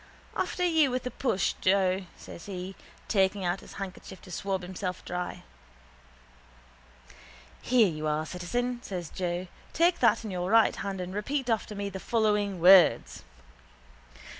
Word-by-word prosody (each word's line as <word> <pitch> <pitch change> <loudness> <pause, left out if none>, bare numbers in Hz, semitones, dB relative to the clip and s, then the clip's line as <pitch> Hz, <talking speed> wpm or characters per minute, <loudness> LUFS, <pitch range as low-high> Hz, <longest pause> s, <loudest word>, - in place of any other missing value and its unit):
—After 360 - -1
you 320 -5 +4
with 255 0 -2
the 250 - -4
push, 225 -6 0
Joe, 190 -1 +2
says 170 - -11
he, 190 -1 -6 0.3
taking 195 -1 +1
out 175 +2 0
his - - -13
handkerchief 190 -1 -8
to 185 - -12
swab 190 +1 -2
himself 185 0 -5
dry. 180 0 -4 2.2
—Here 240 -4 +4
you 155 -3 -3
are, 155 +1 0
citizen, 240 +9 -3
says 180 -8 -6
Joe. 180 -1 -3 0.3
Take 345 +2 +3
that 230 -2 +3
in 210 - -4
your 180 0 -2
right 225 +1 +5
hand 195 -2 -4
and 180 +1 -6
repeat 250 +5 -2
after 220 -1 -1
me 200 0 -3
the 190 - -6
following 210 -3 0
words. 180 -1 +6
195 Hz, 145 wpm, -28 LUFS, 180-225 Hz, 2.2 s, words